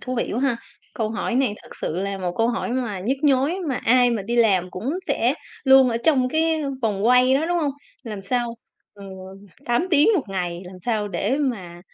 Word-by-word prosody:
thú 255 - -4
vị 235 - -2
quá 240 - -1
ha. 270 -3 +1 0.4
Câu 220 -2 -2
hỏi 235 +1 -2
này 255 -4 +1
thực - - -14
sự 160 - -3
là 195 +1 -2
một 180 -2 -2
câu 225 +1 +2
hỏi 240 0 -2
mà 235 -7 -2
nhức 245 +9 0
nhối, 285 +4 +2
mà 270 - 0
ai 245 +1 +3
mà 225 -4 -1
đi 235 +5 -3
làm 195 -6 +3
cũng 210 +10 -4 0.2
sẽ - - +1 0.3
luôn 265 -1 +7
ở 230 - 0
trong 265 -5 +3
cái, 320 +2 +1
ưm, 275 -2 -4
vòng 210 -2 0
quay 250 +1 +5
đó, 295 +4 +1
đúng 350 0 +1
hông? 300 -4 0 0.3
Làm 215 -5 -7
sao, 240 +3 -1 0.4
ừ, 200 - -13 0.6
8 240 +9 +1
tiếng 305 0 +5
1 350 - +1
ngày, 180 -2 -3
làm 180 +1 -10
sao 215 -2 -1
để 200 +7 -1
mà 200 -12 -3
240 Hz, 220 wpm, -23 LUFS, 200-265 Hz, 0.6 s, luôn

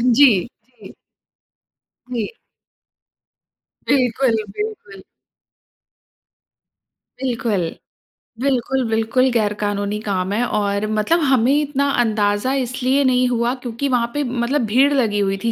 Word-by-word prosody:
जी, 285 -2 +8 0.2
जी। 235 -3 -17 1.2
जी। 240 - -3 1.5
बिल्कुल, 255 -2 +2 0.2
बिल्कुल। 300 - -6 2.2
बिल्कुल। 230 -7 -1 0.8
बिल्कुल, 265 -1 0
बिल्कुल 225 +4 +2
गैर 215 -3 +1
कानूनी 205 0 -2
काम 190 -2 -2
है 235 +3 +1
और 205 -1 -1
मतलब 325 +11 +2
हमें 255 0 +3
इतना 280 -1 0
अंदाज़ा 210 +2 0
इसलिए 260 +1 0
नहीं 255 -1 +3
हुआ 235 0 0
क्योंकि 240 +4 -3
वहाँ 240 -2 +1
पे 290 0 -1
मतलब 250 +2 -1
भीड़ 260 +7 +3
लगी 220 -6 +1
हुई 195 -1 0
थी 230 - +1
240 Hz, 110 wpm, -20 LUFS, 210-265 Hz, 2.2 s, जी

